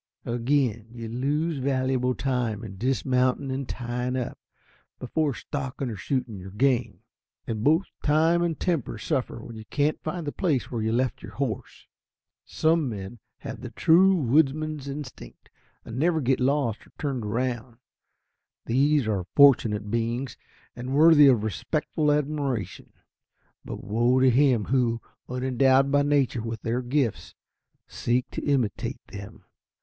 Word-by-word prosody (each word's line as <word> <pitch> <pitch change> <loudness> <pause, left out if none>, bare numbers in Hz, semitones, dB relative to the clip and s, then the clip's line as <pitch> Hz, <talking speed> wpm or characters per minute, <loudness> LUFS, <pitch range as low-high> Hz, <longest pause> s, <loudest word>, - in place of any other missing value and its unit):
Again, 120 -2 0
you 115 -1 -7
lose 145 +6 -1
valuable 130 -1 0
time 125 -5 -1
in 100 -4 -8
dismounting 130 +2 +1
and 135 0 -4
tying 125 +1 -3
up, 125 -2 -4 0.6
before 145 +2 -1
stalking 135 -2 -4
or - - -5
shooting 115 0 -3
your 95 +1 -9
game. 120 -2 0 0.4
And 110 -2 -3
both 160 +7 +4 0.2
time 160 +3 +3
and 170 -2 -1
temper 165 -11 -1
suffer 130 +1 -2
when 115 - -9
you 110 0 -9
can't 145 +5 0
find 165 +1 -4
the 145 - -2
place 150 -9 -1
where 115 -3 -2
you 110 +1 0
left 125 +1 0
your - - -10
horse. 130 -6 -4 0.6
Some 160 -3 +1
men 105 +1 -7 0.2
have - - -7
the - - -6
true 190 +4 +5
woodsman's 150 0 +1
instinct, 135 - -9 0.3
and 115 - -6
never 165 +1 +2
get 130 -2 +1
lost 130 -4 0
or - - -23
turned 135 -5 -2
round. 120 +1 -3 0.9
These 140 +1 +2
are 95 -4 -1
fortunate 110 -7 +5
beings, 120 +3 -2 0.4
and 125 +3 -4
worthy 155 -1 +7
of 120 -6 +4
respectful 150 - -1
admiration. 145 -6 -2 0.7
But - - -7
woe 120 +5 +2
to 130 0 +5
him 125 -4 +3
who, 120 -3 +1 0.3
unendowed 130 +2 +2
by 145 0 +4
nature 140 -4 +1
with 115 -1 -5
their 120 +2 -1
gifts, 125 -2 -1 0.5
seeks 125 +3 -1
to - - -5
imitate 130 -8 -1
them. 100 0 -10
130 Hz, 145 wpm, -26 LUFS, 115-145 Hz, 0.9 s, worthy